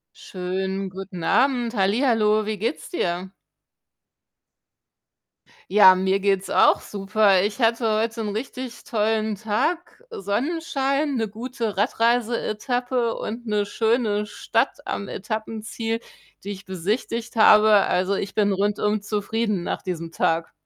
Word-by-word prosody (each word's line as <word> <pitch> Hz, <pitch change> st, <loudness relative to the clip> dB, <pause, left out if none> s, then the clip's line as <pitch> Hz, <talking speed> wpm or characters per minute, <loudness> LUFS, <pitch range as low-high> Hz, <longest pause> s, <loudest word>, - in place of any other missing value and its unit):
Schönen 190 Hz, +1 st, -4 dB
guten 185 Hz, -2 st, -8 dB
Abend, 245 Hz, +4 st, +2 dB
hallihallo, 215 Hz, +1 st, +2 dB
wie 215 Hz, -1 st, -2 dB
geht's 230 Hz, +9 st, -3 dB
dir? 180 Hz, -, -2 dB, 2.4 s
Ja, 190 Hz, -2 st, +8 dB
mir 190 Hz, +1 st, +1 dB
geht's 195 Hz, -1 st, 0 dB
auch -, -, +4 dB
super. 200 Hz, -1 st, +2 dB
Ich 210 Hz, +4 st, -2 dB
hatte 230 Hz, 0 st, +2 dB
heut 230 Hz, +1 st, -2 dB
'n 220 Hz, -2 st, -2 dB
richtig 245 Hz, +3 st, -6 dB
tollen 220 Hz, -2 st, 0 dB
Tag, 255 Hz, -, -2 dB
äh, -, -, -7 dB
Sonnenschein, 275 Hz, -, -1 dB
'ne 225 Hz, -3 st, 0 dB
gute 230 Hz, -1 st, -4 dB
Radreise-Etappe 235 Hz, +2 st, 0 dB
und 235 Hz, +3 st, -6 dB
'ne 210 Hz, -2 st, 0 dB
schöne 220 Hz, -1 st, 0 dB
Stadt 210 Hz, -, -1 dB
am 200 Hz, -, -3 dB
Etappenziel, 220 Hz, +2 st, -4 dB, 0.4 s
die 200 Hz, -, -6 dB
ich 200 Hz, -1 st, -7 dB
besichtigt 215 Hz, +6 st, -3 dB
habe. 215 Hz, -1 st, +6 dB, 0.2 s
Also, 185 Hz, +2 st, +1 dB
ich 195 Hz, -, -4 dB
bin 205 Hz, -1 st, +2 dB
rundum 205 Hz, +1 st, 0 dB
zufrieden 210 Hz, -1 st, -1 dB
nach -, -, -4 dB
diesem 170 Hz, -3 st, -5 dB
Tag. 165 Hz, 0 st, 0 dB
215 Hz, 120 wpm, -23 LUFS, 195-235 Hz, 2.4 s, Ja